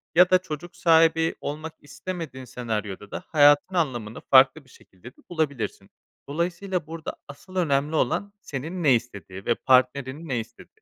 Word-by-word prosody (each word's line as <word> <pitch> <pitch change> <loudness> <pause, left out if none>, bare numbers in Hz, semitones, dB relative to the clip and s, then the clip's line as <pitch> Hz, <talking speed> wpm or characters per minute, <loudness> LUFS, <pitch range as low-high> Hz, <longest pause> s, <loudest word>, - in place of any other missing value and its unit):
ya 180 +1 +7
da 185 - +6
çocuk 175 0 -8
sahibi 165 -2 +4
olmak 155 +2 -5
istemediğin 145 -2 -7
senaryoda 105 -5 -5
da - - -5
hayatın 145 +4 +5
anlamını 120 -9 -2
farklı 135 +3 +5
bir - - -23
şekilde 110 +1 -15
de - - -38
bulabilirsin. 140 - -3 0.4
Dolayısıyla 175 +2 -2
burada 165 -1 -6
asıl 185 +6 -13
önemli 150 -3 +1
olan 200 +9 0
senin 160 +5 -5
ne 135 -4 +6
istediğin 100 -5 -6
ve 120 - +2
partnerinin 130 +4 +1
ne 125 -3 0
istediği. 270 - -12
145 Hz, 150 wpm, -25 LUFS, 125-170 Hz, 0.4 s, ya